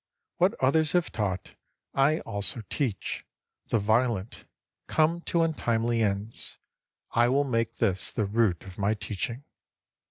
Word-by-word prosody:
What - - +3
others 150 +4 +3
have 175 -2 +2
taught, 95 -4 -2 0.4
I 145 +4 +3
also 105 +1 +1
teach; 120 - -2 0.4
the - - +2
violent 110 0 0 0.4
come 165 +2 +2
to 170 -1 +3
untimely 120 -7 +1
ends. 105 +1 -2 0.5
I 120 +1 +4
will 140 +3 +3
make 115 -4 -1
this 95 -1 +1
the 110 - 0
root 105 -4 +1
of 95 0 -11
my 100 +2 +2
teaching. 105 +5 -4
115 Hz, 130 wpm, -28 LUFS, 100-135 Hz, 0.5 s, I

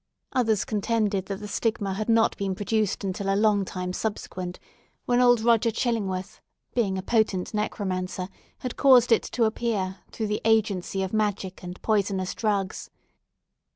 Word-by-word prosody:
Others 220 -5 +2
contended 210 -2 0
that 195 0 -4
the 210 - -5
stigma 205 -2 -1
had 215 +4 -3
not 225 0 +4
been 195 -1 -2
produced 210 +1 0
until 195 +1 -1
a - - +2
long 210 -1 +3
time 180 -1 -4
subsequent, 185 -4 -4 0.5
when 245 0 +3
old 245 -2 +5
Roger 230 0 +4
Chillingworth, 205 -5 -2 0.3
being 200 -6 +1
a 190 - -4
potent 210 -4 +1
necromancer, 185 -3 -2 0.3
had 255 - -5
caused 250 -3 +6
it 230 - +6
to 240 - -1
appear, 220 -4 -1
through 220 - -3
the 210 0 -2
agency 200 -4 +1
of 190 - -4
magic 205 -3 -1
and 180 0 -8
poisonous 195 -3 0
drugs. 200 -3 -1
205 Hz, 155 wpm, -26 LUFS, 190-225 Hz, 0.5 s, caused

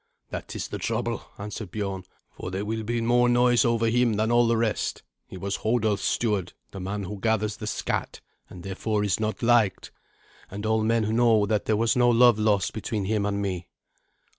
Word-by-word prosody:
"That - - -6
is - - -3
the - - -5
trouble," - - -2
answered 105 0 -6
Biorn, 95 -1 -4 0.3
"for - - -7
there 95 +2 -3
will 110 +1 -2
be 115 +2 -2
more 120 +1 +3
noise 120 0 +4
over 115 -2 +1
him 120 0 +2
than 110 +2 0
all 120 0 +4
the 115 0 +2
rest. 110 -2 -1 0.2
He 95 - -9
was 100 +1 -3
Hodulf's 110 -2 0
steward, 105 -6 0 0.2
the 95 - -8
man 100 +2 -4
who 100 +2 -6
gathers 110 -1 0
the 105 - -6
scatt, - - -3 0.3
and 90 - -11
therefore 105 +2 -2
is 100 -2 0
not 110 +2 -2
liked. 115 -5 +2 0.6
And 105 +2 -6
all 110 0 +2
men 110 -1 +1
know 115 -3 +4
that 105 0 0
there 110 - +1
was 115 0 +2
no 120 -1 +4
love 120 -2 +5
lost 105 -3 +1
between 110 -2 -3
him 105 0 0
and 100 0 -1
me." 90 -3 -3
110 Hz, 195 wpm, -26 LUFS, 100-115 Hz, 0.6 s, love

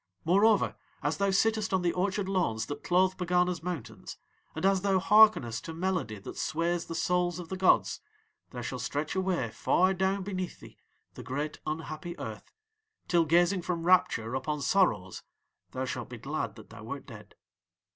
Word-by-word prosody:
"'Moreover, 200 +5 +4 0.3
as 150 +2 0
thou 200 0 +1
sittest 215 +1 +2
on 185 - 0
the 175 - +1
orchard 195 +1 -1
lawns 170 - 0
that 145 - -7
clothe 185 +1 +3
Pegana's 180 -1 +1
mountains, 170 -7 -6 0.4
and 160 - -2
as 195 -1 +3
thou 195 -1 +2
hearkenest 190 - +5
to 160 - -6
melody 175 - -2
that 100 - -9
sways 170 +2 -1
the 165 - -5
souls 175 +1 +1
of 175 -2 -8
the 190 - -3
gods, 185 0 +3 0.5
there 125 -1 -7
shall 125 +2 -4
stretch 145 +5 -2
away 185 -11 0
far 185 +10 +2
down 190 +1 0
beneath 185 -2 -4
thee - - -15 0.3
the - - -9
great 145 +4 -4
unhappy 155 +2 -5
Earth, - - -8 0.6
till 170 -2 +3
gazing 175 +4 +3
from 170 -1 -3
rapture 125 -10 +3
upon 150 +3 -2
sorrows 110 - +1 0.5
thou - - -3
shalt - - -5
be - - -7
glad - - -4
that - - -14
thou - - -11
wert - - -6
dead. - - -13
175 Hz, 170 wpm, -29 LUFS, 155-190 Hz, 0.6 s, hearkenest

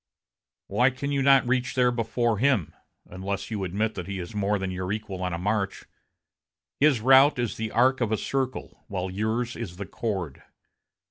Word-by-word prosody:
Why 125 +2 +3
can 135 +2 -4
you 140 -1 +1
not 135 -2 +5
reach 125 +1 0
there 125 -1 +4
before 115 -1 0
him, 105 - +2 0.3
unless 95 +3 -5
you 105 -3 -2
admit 105 +5 -1
that 90 -2 -6
he 100 0 -4
is 90 +1 -6
more 105 0 0
than 95 -1 -3
your 90 +1 -3
equal 105 -3 -4
on 90 0 -1
a 85 - -2
march? 100 +2 -2 0.9
His 140 -5 +4
route 135 +4 +6
is 120 -3 -1
the 110 0 -3
arc 130 +3 +3
of 115 -3 0
a 110 - +2
circle, 130 +1 -3
while 95 -2 -3
yours 110 +5 -1
is 95 -7 -6
the 100 - -5
chord. 95 - -4
110 Hz, 185 wpm, -26 LUFS, 95-125 Hz, 0.9 s, route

